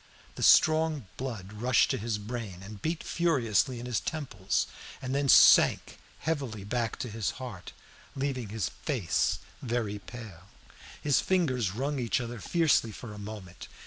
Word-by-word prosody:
The - - -8
strong 155 -4 +5
blood 110 -7 -6
rushed 120 +4 +3
to 135 - 0
his 110 0 -2
brain 105 -4 -6
and 100 0 -10
beat 160 +4 -2
furiously 130 -7 +1
in 120 - -7
his 125 -3 0
temples, 115 -11 -2 0.3
and 130 0 -4
then 140 0 +1
sank - - +6 0.2
heavily 135 -10 -2
back 115 +2 -2
to - - -3
his 110 -2 -2
heart, 120 -9 -8 0.4
leaving 135 -5 -2
his 105 -6 -2
face - - 0 0.2
very 115 -4 -2
pale. 100 -5 -11 0.5
His 145 -2 +2
fingers 130 - +1
wrung 140 +3 -1
each 120 +1 0
other 120 -1 -5
fiercely 155 -6 +2
for 105 0 -9
a 105 - -9
moment. 100 -3 -8
120 Hz, 150 wpm, -29 LUFS, 105-135 Hz, 0.5 s, sank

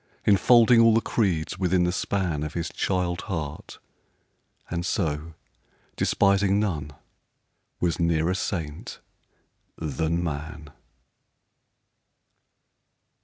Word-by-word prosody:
Enfolding 115 +3 +6
all 115 -1 +5
the - - +5
creeds 95 -7 -1
within 90 -1 +2
the 90 - +1
span 90 -4 -1
Of 75 +1 -5
his 85 -1 -2
child 90 -2 -1
heart; 75 -5 -5 0.9
and 85 0 -3
so, 80 -3 -2 0.6
despising 100 0 +2
none, 75 -9 -2 0.9
Was 85 -1 0
nearer 85 +1 +1
saint 80 -5 -4 0.8
than 80 +2 -2
man. 75 -1 -6
85 Hz, 90 wpm, -25 LUFS, 80-95 Hz, 0.9 s, Enfolding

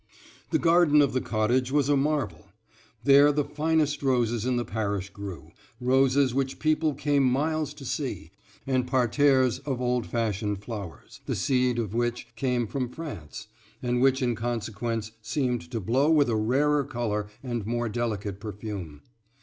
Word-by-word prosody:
The - - +2
garden 165 -3 +4
of 140 -3 +3
the 130 - +1
cottage 120 +4 0
was 145 -1 +2
a 145 - +3
marvel; 135 - -1 0.6
there 140 +2 +7
the 145 0 +1
finest 150 0 0
roses 120 -4 +1
in 130 - +1
the 120 0 -1
parish 100 -3 -3
grew, 95 -7 -8 0.3
roses 130 +1 +3
which 135 0 -1
people 155 -1 +1
came 145 0 +1
miles 150 +4 +1
to 145 -2 -10
see, - - -4 0.3
and 130 -2 0
parterres 130 0 +3
of 135 -4 -3
old 125 -2 0
fashioned 105 -3 -2
flowers, 100 - -8
the - - -1
seed 125 -2 +1
of 110 -4 -2
which 120 +1 -1
came 125 0 0
from 125 +2 -3
France, 110 - -8 0.4
and 125 0 0
which 135 0 +3
in 120 -1 +1
consequence 115 -1 -3
seemed 125 0 -2
to 120 -3 -3
blow 130 - +2
with 145 -6 +4
a - - +1
rarer 140 +7 +2
color 110 -5 -2 0.2
and 120 -5 -3
more 120 0 -1
delicate 105 -4 -3
perfume. 100 -7 -7
125 Hz, 155 wpm, -27 LUFS, 110-140 Hz, 0.6 s, there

